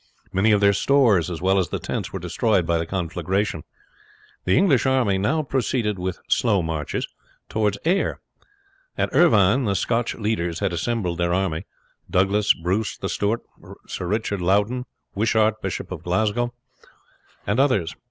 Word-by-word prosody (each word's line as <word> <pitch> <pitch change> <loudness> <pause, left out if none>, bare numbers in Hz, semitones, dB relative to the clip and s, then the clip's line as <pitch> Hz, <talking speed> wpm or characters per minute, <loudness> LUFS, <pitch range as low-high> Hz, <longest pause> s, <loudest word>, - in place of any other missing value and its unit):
Many 95 +4 +3
of 105 -1 +3
their 100 0 +5
stores, 110 - +3
as 85 0 -6
well 95 +1 +3
as 90 - -1
the - - -2
tents, - - -4
were - - -4
destroyed 105 -7 0
by 85 0 +1
the 80 - -3
conflagration. 95 +1 -2 0.8
The 90 - +3
English 145 - +3
army 120 -8 +2
now 150 +11 +1
proceeded 120 -6 -1
with 90 0 -3
slow 105 -7 +2
marches 80 -3 -3 0.4
towards 105 -2 0
Ayr. 185 +4 +1 0.8
At - - -1
Irvine 125 - +4
the 100 -2 0
Scotch 115 +5 0
leaders 105 -7 -2
had 95 -1 -1
assembled 90 -2 -2
their 85 0 +1
army 95 -2 -2 0.4
Douglas, 100 +3 +3
Bruce, 95 +6 -2
The 95 - -4
Steward, 105 +3 0 0.4
Sir 90 - -5
Richard 105 -1 -1
Loudon, 105 +8 +1 0.3
Wishart, 110 +1 +1
Bishop 95 -1 -4
of 90 -4 -5
Glasgow, 110 +7 0 0.9
and 100 +5 0
others. 105 - +2
100 Hz, 150 wpm, -23 LUFS, 90-115 Hz, 0.9 s, their